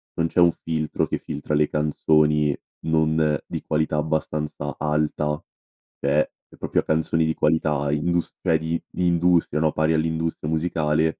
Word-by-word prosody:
non 85 - +1
c'è 85 - -1
un 85 -1 +6
filtro, 80 -2 -2
che - - -1
filtra 75 +1 -5
le 75 0 +2
canzoni 75 -1 +2 0.3
non 80 -1 +2
di - - -5
qualità 75 0 0
abbastanza 75 -1 -2
alta. 75 0 -1 0.6
Cioè, 75 +2 +1 0.2
è - - -17
proprio - - -1
a - - -17
canzoni 80 +1 +1
di 80 - +1
qualità, 75 -2 +1
industria 85 +2 0
di 80 +1 -2
di 90 - -1
industria, 85 -2 +2
no, 80 -1 +3
pari 80 +1 +2
all'industria 80 0 -1
musicale, 80 -1 0
80 Hz, 150 wpm, -23 LUFS, 75-80 Hz, 0.6 s, un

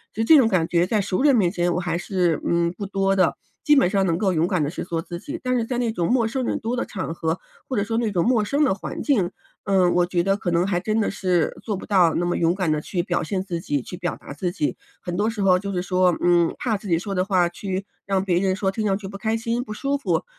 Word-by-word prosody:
就 225 - 0
这 315 - +7
种 265 -6 +6
感 180 -7 +1
觉 175 +1 +2
在 215 0 +1
熟 190 +1 -1
人 280 -1 +5
面 190 -7 +3
前 175 -2 0
我 - - 0
还 175 -2 -2
是， 175 -2 0
嗯， 170 0 +1
不 200 0 -5
多 195 0 +1
的， 185 -3 +3 0.3
基 300 -1 +5
本 270 - +5
上 195 +1 +1
能 165 -1 +1
够 190 0 +1
勇 165 0 +2
敢 180 -5 0
地 145 - -2
去 - - -5
做 165 -1 -3
自 175 0 -7
己。 300 - -6
但 255 0 0
是 235 - +1
在 240 +2 -3
那 240 -2 0
种 175 -4 -1
陌 240 -3 +3
生 255 +3 -2
人 - - -1
多 230 +3 -2
的 245 - -2
场 185 -4 -4
合， 165 +1 -2 0.3
或 260 - -2
者 200 - +2
说 225 +2 -1
那 225 -3 0
种 175 -4 +1
陌 235 -4 +3
生 285 +8 +1
的 260 - +3
环 190 - -6
境， 215 - +2 0.4
嗯， 190 -2 +3
我 175 0 +3
觉 175 -1 0
得 195 +2 +2
可 190 -5 -3
能 170 +1 +2
还 185 -2 0
真 215 +4 -1
的 215 - 0
是 180 -5 0
做 210 -4 -3
不 - - -8
到 180 -5 +4
那 175 - 0
么 175 - 0
勇 170 +1 +2
敢 180 -5 0
地 150 -1 0
去 175 +1 -2
表 175 -1 -1
现 185 +3 -2
自 170 -3 -4
己、 145 -5 -1
去 - - -8
表 175 -1 -3
达 - - -10
自 175 +5 -2
己。 150 -4 -2 0.3
很 175 - -4
多 205 +4 +1
时 225 -2 -4
候 185 -2 +4
就 200 +1 -4
是 180 -2 -1
说， 180 -1 +2
嗯， 175 -1 +3
怕 230 -4 -1
自 200 0 -10
己 170 - +2
说 195 +4 -4
的 185 -1 +1
话 185 -3 +2
去 190 +1 -4 0.2
让 195 -1 +1
别 175 -3 +2
人 190 0 +1
说 195 -1 0
听 215 +3 -3
上 195 -2 +1
去 200 -1 -8
不 195 +1 -8
开 220 +3 -1
心， 230 +2 -2
不 215 - -7
舒 275 +6 -1
服， 180 - 0
190 Hz, 315 characters per minute, -23 LUFS, 175-215 Hz, 0.4 s, 这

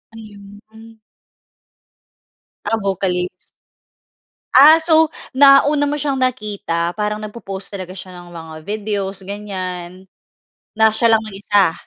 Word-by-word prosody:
Ayun, 205 -2 -13
hmm. 225 0 -15 1.7
Ah, 225 - 0
vocalist. 180 -2 -3 1.1
Ah, 305 +5 +9
so, 320 -1 +3 0.2
nauna 285 +1 +5
mo 295 0 -2
siyang 280 -2 0
nakita 205 -9 -2
parang 210 0 -2
nagpo-post 200 -3 -7
talaga 185 -2 -6
siya 185 -1 -9
ng 175 - -15
mga 160 -2 -10
videos, 205 -1 -4
ganiyan, 185 -2 -7 0.7
na 220 -1 +4
siya 230 +1 +2
lang 220 - -4
mag-isa? 200 -3 +1
205 Hz, 110 wpm, -18 LUFS, 185-225 Hz, 1.7 s, Ah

